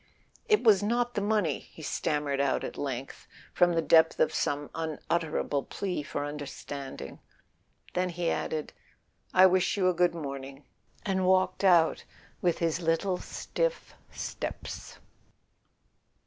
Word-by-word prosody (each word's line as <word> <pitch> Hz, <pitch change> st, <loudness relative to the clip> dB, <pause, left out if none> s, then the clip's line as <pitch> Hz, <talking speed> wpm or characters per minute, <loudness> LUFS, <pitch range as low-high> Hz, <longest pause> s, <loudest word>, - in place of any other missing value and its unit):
"It 425 Hz, -, +4 dB
was 215 Hz, -5 st, +6 dB
not 240 Hz, +3 st, 0 dB
the 205 Hz, -, -1 dB
money.. 205 Hz, -8 st, +1 dB
." -, -, -25 dB
he 160 Hz, -, -10 dB
stammered 145 Hz, -2 st, -1 dB
out 140 Hz, -1 st, +1 dB
at -, -, -5 dB
length, 135 Hz, -2 st, -5 dB, 0.3 s
from 175 Hz, -1 st, +4 dB
the 165 Hz, -1 st, +1 dB
depth 160 Hz, 0 st, +5 dB
of -, -, +3 dB
some 145 Hz, 0 st, -1 dB
unutterable 160 Hz, -2 st, -1 dB
plea 185 Hz, +2 st, -3 dB
for 145 Hz, 0 st, -4 dB
understanding; 140 Hz, -, -7 dB, 0.7 s
then 180 Hz, 0 st, 0 dB
he 175 Hz, -1 st, -1 dB
added: 155 Hz, -1 st, -3 dB, 0.6 s
"I 185 Hz, 0 st, +7 dB
wish 185 Hz, +2 st, +3 dB
you 185 Hz, -2 st, +3 dB
a -, -, +2 dB
good 175 Hz, 0 st, +2 dB
morning," 140 Hz, -2 st, -6 dB, 0.4 s
and 190 Hz, -3 st, +1 dB
walked 185 Hz, +1 st, +2 dB
out 175 Hz, -4 st, +4 dB, 0.4 s
with 175 Hz, -2 st, +2 dB
his 165 Hz, 0 st, 0 dB
little 170 Hz, +3 st, +1 dB
stiff -, -, -3 dB, 0.2 s
steps. -, -, -6 dB
165 Hz, 135 wpm, -29 LUFS, 145-185 Hz, 0.7 s, I